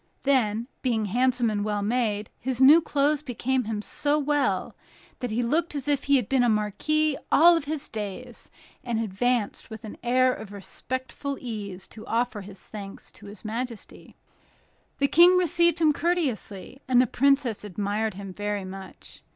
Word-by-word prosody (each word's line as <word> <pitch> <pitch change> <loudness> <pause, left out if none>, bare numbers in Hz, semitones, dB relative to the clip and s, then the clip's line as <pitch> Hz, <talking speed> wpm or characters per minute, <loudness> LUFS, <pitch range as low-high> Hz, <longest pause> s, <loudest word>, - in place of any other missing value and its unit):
Then, 235 -5 +1
being 230 -4 0
handsome 245 +2 +1
and 205 -1 -1
well 210 -1 -1
made, 215 -2 -1
his 255 -1 -3
new 290 +5 +8
clothes 290 -1 +1
became 260 -2 -1
him 215 -1 -3
so 290 +5 0
well, 290 -1 0 0.4
that 250 - -3
he 230 +3 0
looked 310 +6 0
as 280 -2 -4
if 285 -2 0
he 280 - +4
had 250 -7 +1
been 265 -2 +2
a 245 - +3
marquis 275 +8 +1
all 335 +2 +6
his 290 0 -4
days, 220 +3 -7 0.3
and 235 -3 -1
advanced 225 +1 -1
with 220 -1 -9
an 215 - -8
air 255 +1 +3
of 220 -4 -9
respectful 260 +7 -5
ease 205 -6 -6
to 220 - -12
offer 235 -2 -1
his 195 -1 -11
thanks 200 -2 -9
to 205 - -14
his 205 +1 -12
majesty. 230 +1 -6 0.8
The 280 - +2
King 350 +5 +6
received 340 -1 +3
him 310 -2 +4
courteously, 270 - -2
and 250 -1 +4
the 255 - +5
princess 270 -3 +1
admired 210 +1 -2
him 195 -1 -8
very 205 0 -3
much. 190 0 -10
245 Hz, 165 wpm, -26 LUFS, 210-280 Hz, 0.8 s, new